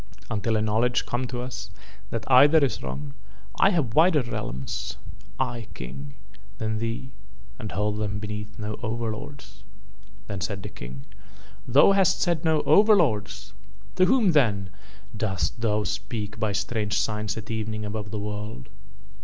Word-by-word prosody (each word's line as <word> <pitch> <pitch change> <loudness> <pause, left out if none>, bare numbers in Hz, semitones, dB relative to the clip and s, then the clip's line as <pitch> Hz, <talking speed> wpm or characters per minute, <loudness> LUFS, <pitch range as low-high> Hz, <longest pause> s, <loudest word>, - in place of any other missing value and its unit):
Until 110 +1 0
a 105 - +1
knowledge 115 +3 +2
come 125 +1 -2
to 120 -1 -4
us 120 -6 -6 0.4
that 115 -1 -3
either 140 +4 +7
is 135 - -3
wrong 70 +2 -5 0.5
I 195 - +6
have 155 - 0
wider 160 -2 +5
realms, 65 - -4 0.4
I 120 -3 -2
King, 135 - -8 0.4
than 110 -1 -2
thee 115 +3 -3 0.5
and 105 -3 -5
hold 105 +4 -1
them 105 -1 -2
beneath 105 0 -6
no 105 0 -4
overlords." 115 +4 -5 0.6
Then 100 -2 -5
said 100 -1 -3
the - - -5
King: 65 +3 -9 0.6
"Thou 135 +9 +7
hast 195 -2 +4
said 170 -3 +1
no 160 -2 +3
overlords! 105 - +3 0.4
To 185 - +6
whom 230 -4 +4
then 105 - +2 0.4
dost 105 0 -1
thou 105 -2 +1
speak 105 0 -4
by 110 -2 +1
strange 105 +1 -1
signs 105 -2 -1
at 110 +1 -6
evening 110 -1 -3
above 105 0 -4
the 105 - -4
world?" 105 - -5
110 Hz, 145 wpm, -26 LUFS, 105-125 Hz, 0.6 s, either